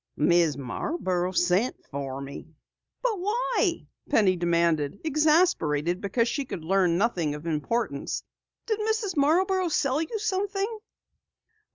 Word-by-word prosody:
"Mrs. 165 -1 +3
Marborough 180 - -2
sent 180 +6 +2
for 135 -1 -5
me." 140 +2 -8 0.6
"But 455 -6 0
why?" 415 -2 0 0.2
Penny 205 -9 +4
demanded, 170 -2 +1
exasperated 300 - +2
because 230 +3 +1
she 280 +4 -1
could 165 -10 -6
learn 180 -1 +2
nothing 175 -8 0
of 150 +2 -9
importance. 165 +1 -2 0.4
"Did 435 -2 -1
Mrs. 430 -3 -1
Marborough 365 +6 +2
sell 275 -1 +1
you 330 +8 -3
something?" 405 +1 -2
225 Hz, 120 wpm, -26 LUFS, -, 0.6 s, Penny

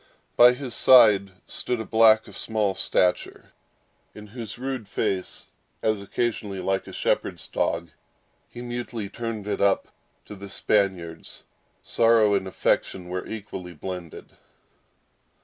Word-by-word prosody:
By 120 +1 +8
his 125 -2 -7
side 110 -7 +6 0.2
stood 125 -2 -3
a 110 - -4
black 110 -1 +5
of 100 - -12
small 105 -2 -1
stature, 90 -1 0 0.6
in 105 - -10
whose 110 +1 -8
rude 130 -3 -4
face, 95 -1 -3 0.4
as 110 -2 +1
occasionally, 105 -1 -3
like 95 0 -1
a - - -8
shepherd's - - -1
dog, 85 -1 -2 0.6
he 120 - -9
mutely 120 -3 -5
turned 115 -3 -5
it 105 - -2
up 100 -1 +2 0.4
into - - -9
the 100 0 -10
Spaniard's, 95 -6 -1 0.4
sorrow 115 -3 +3
and 100 -1 0
affection 90 -1 -1
were 90 0 -4
equally 95 -5 -7
blended. 90 0 -8
105 Hz, 130 wpm, -25 LUFS, 95-115 Hz, 0.6 s, By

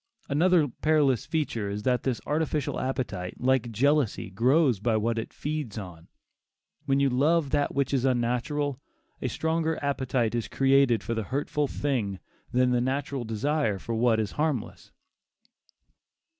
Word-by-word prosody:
Another 165 +2 +3
perilous 145 -2 +1
feature 120 -10 -1
is 105 +1 -4
that 125 -1 +1
this 130 -3 -1
artificial 150 -1 -1
appetite, 105 -9 -3
like 125 -2 +1
jealousy, 135 -3 +1
"grows 125 - +3
by 110 +1 +1
what 115 +1 0
it 115 - -6
feeds 150 -7 -4
on"; 90 -5 -8 0.8
when 135 0 +3
you 140 - +3
love 145 +3 +2
that 145 -1 0
which 140 0 0
is 130 -3 +1
unnatural, 130 +3 0 0.4
a - - -1
stronger 160 0 -1
appetite 130 -5 0
is 120 -2 -2
created 135 -5 +3
for 115 - -2
the 110 - -1
hurtful 145 +3 -1
thing 120 -10 -2 0.3
than 125 0 +3
the 125 -1 +2
natural 135 +1 -2
desire 115 +1 0
for 115 +5 -5
what 115 0 +2
is 105 -2 -1
harmless. 155 0 -3
130 Hz, 145 wpm, -27 LUFS, 115-145 Hz, 0.8 s, Another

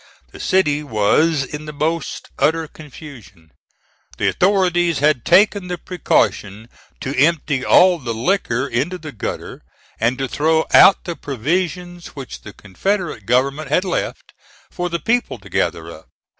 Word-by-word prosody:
The - - -12
city 150 -6 +1
was 140 +5 +1
in 150 +3 -7
the 150 - -6
most 160 +3 -3
utter 160 +1 +1
confusion. 125 - -13 0.7
The - - +1
authorities 175 -4 +2
had 145 -4 +2
taken 200 -1 +3
the 180 0 -4
precaution 110 - -1 0.3
to 135 +2 -4
empty 145 -2 +1
all 180 +4 +5
the 120 -5 -5
liquor 125 - 0
into 140 +8 -2
the 155 -3 -9
gutter, 110 - -6 0.4
and 115 +3 +1
to 135 -1 -2
throw 160 +4 +1
out 195 - +7
the 170 -2 -5
provisions 175 +7 -3
which 135 -3 -8
the 105 - -10
Confederate 140 - -3
government 135 +4 +1
had 180 +6 +1
left, 180 - -4 0.4
for 180 0 -3
the 170 - -1
people 235 - -1
to - - -15
gather - - -2
up. - - -14
155 Hz, 145 wpm, -19 LUFS, 130-175 Hz, 0.7 s, out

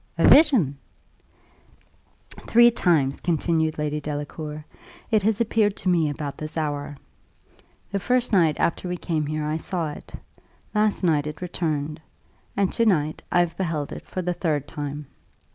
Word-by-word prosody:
"A - - +4
vision!" 225 - +5 1.5
"Three 240 +1 +4
times," 155 -11 +1
continued 160 -1 0
Lady 150 0 -2
Delacour, 150 +1 -5 0.5
"it 215 -2 +4
has 215 +2 +1
appeared 220 -3 +2
to 185 - -1
me 165 -4 +3
about 145 -1 -5
this 155 +1 -6
hour. 145 -2 -3 0.9
The 200 - 0
first 245 +3 0
night 165 -6 +3
after 180 +2 0
we 180 - -2
came 155 -4 -2
here 155 0 -2
I 155 +1 -1
saw 165 -2 -3
it; - - -11 0.6
last 210 -2 +1
night 155 -4 +2
it 150 0 -6
returned; 155 -4 -3 0.6
and 200 -2 +1
to 230 - +2
night 155 -6 +1
I 175 - +4
have 170 -1 -1
beheld 165 -6 -2
it - - -8
for 185 - -4
the 180 +1 0
third 150 -5 -1
time. 145 -1 -5
160 Hz, 155 wpm, -24 LUFS, 150-185 Hz, 1.5 s, vision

